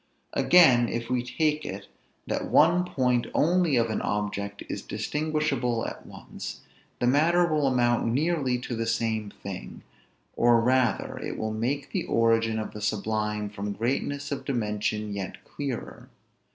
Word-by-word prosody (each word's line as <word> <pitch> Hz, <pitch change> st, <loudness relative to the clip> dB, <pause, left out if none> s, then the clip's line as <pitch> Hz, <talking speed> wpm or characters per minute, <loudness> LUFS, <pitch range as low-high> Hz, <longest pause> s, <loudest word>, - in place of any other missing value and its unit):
Again, 130 Hz, -10 st, +6 dB
if 115 Hz, +1 st, -4 dB
we 125 Hz, -1 st, +2 dB
take 155 Hz, +4 st, 0 dB
it, 95 Hz, +1 st, -6 dB, 0.4 s
that -, -, -2 dB
one 170 Hz, +3 st, +5 dB
point 125 Hz, -7 st, +1 dB
only 170 Hz, -2 st, +3 dB
of 115 Hz, -2 st, +2 dB
an -, -, -1 dB
object 100 Hz, -1 st, -3 dB
is -, -, -4 dB
distinguishable 150 Hz, -6 st, -1 dB
at -, -, -7 dB
once; -, -, -8 dB, 0.4 s
the -, -, +1 dB
matter 160 Hz, +7 st, +4 dB
will 155 Hz, -4 st, +1 dB
amount 120 Hz, -3 st, +2 dB
nearly 140 Hz, -2 st, +1 dB
to 125 Hz, -, -4 dB
the 115 Hz, 0 st, -2 dB
same 110 Hz, -2 st, -1 dB
thing, 100 Hz, -2 st, -8 dB, 0.5 s
or 120 Hz, 0 st, +5 dB
rather 125 Hz, 0 st, +1 dB
it -, -, -5 dB
will 110 Hz, 0 st, -2 dB
make 125 Hz, +6 st, -2 dB
the -, -, -1 dB
origin 115 Hz, -1 st, +2 dB
of 110 Hz, -, -4 dB
the 105 Hz, -, -8 dB
sublime 105 Hz, 0 st, -1 dB
from 100 Hz, 0 st, -4 dB
greatness 140 Hz, +5 st, -2 dB
of 140 Hz, -, -3 dB
dimension 105 Hz, -4 st, -2 dB
yet 100 Hz, -2 st, -6 dB
clearer. 140 Hz, -4 st, -6 dB
120 Hz, 150 wpm, -27 LUFS, 110-145 Hz, 0.5 s, Again